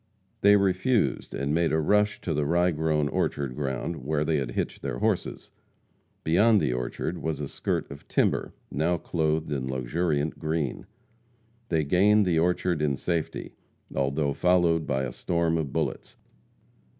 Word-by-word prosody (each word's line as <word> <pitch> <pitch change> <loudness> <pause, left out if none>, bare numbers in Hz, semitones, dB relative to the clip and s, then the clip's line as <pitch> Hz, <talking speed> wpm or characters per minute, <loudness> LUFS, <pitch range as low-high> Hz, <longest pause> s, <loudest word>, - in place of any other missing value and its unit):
They 100 +1 +7
refused, 100 +4 +1
and 70 +1 -1
made 85 0 +2
a 80 - +2
rush 105 +6 +2
to 85 - -2
the 75 0 0
rye 85 +4 +2
grown 75 -1 0
orchard 70 -3 -1
ground, 70 +3 -3
where 75 +2 0
they 80 0 +1
had 65 -4 -3
hitched - - -3
their 70 -3 -3
horses. - - -2 0.7
Beyond 105 +7 +4
the 60 - 0
orchard 60 +7 -3
was 80 -2 -3
a 75 - -3
skirt - - -3
of 70 - -11
timber, - - +1 0.2
now 80 +5 +1
clothed 80 -2 -1
in 65 -3 -2
luxuriant 75 +4 -1
green. 80 -4 -2 0.8
They 80 -3 +2
gained 100 +7 +4
the 85 -3 +2
orchard 90 -1 +1
in 70 -3 +1
safety, 85 0 -3 0.4
although 70 +1 0
followed 85 -1 +2
by 65 -1 0
a 60 - -3
storm 85 -1 0
of 80 -4 -2
bullets. - - -3
80 Hz, 155 wpm, -27 LUFS, 70-85 Hz, 0.8 s, They